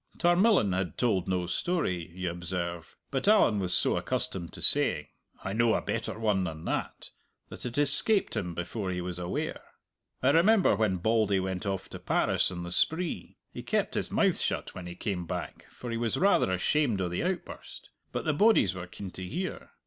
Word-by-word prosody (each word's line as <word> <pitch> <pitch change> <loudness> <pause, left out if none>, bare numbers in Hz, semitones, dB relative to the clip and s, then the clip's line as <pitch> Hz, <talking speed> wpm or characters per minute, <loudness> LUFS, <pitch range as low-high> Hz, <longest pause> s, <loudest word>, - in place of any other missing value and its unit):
Tarmillan 175 - +4
had 90 -3 -2
told 100 -8 +1
no 90 -1 0
story, 90 - -1
you 90 -2 -2
observe, 85 -1 -5
but 135 +6 -2
Allan 205 - +5
was 90 -2 -2
so - - +2
accustomed 85 -3 -3
to - - -9
saying - - +3 0.3
"I 100 - -3
know 115 +1 +3
a - - 0
better - - -3
one 105 -4 +1
than 80 -2 -5
that," - - -4 0.4
that - - -6
it 120 +3 -6
escaped 145 +9 +3
him 90 -3 -3
before 95 +4 -4
he 90 -1 -2
was 90 0 -4
aware. 90 0 -3 0.6
"I 135 - +5
remember 185 - +4
when 100 -3 +1
Bauldy 105 0 +2
went 95 +1 -3
off 95 -1 -3
to - - -8
Paris - - +1
on 90 -1 -6
the 85 - -6
spree. 160 - -1 0.2
He - - -6
kept - - -1
his - - -1
mouth - - +2
shut - - -2
when 90 - -8
he 85 - -7
came 90 -3 -3
back, - - -6
for 120 - -8
he 115 - -2
was 115 -1 -1
rather 195 - +3
ashamed 115 +4 +1
o' 95 - 0
the 90 - -2
outburst. 180 0 -5 0.2
But - - -4
the 155 - +2
bodies 180 - +4
were 90 -1 -7
keen 95 +1 -8
to 95 - -8
hear. 180 - -5
95 Hz, 195 wpm, -29 LUFS, 90-140 Hz, 0.6 s, Allan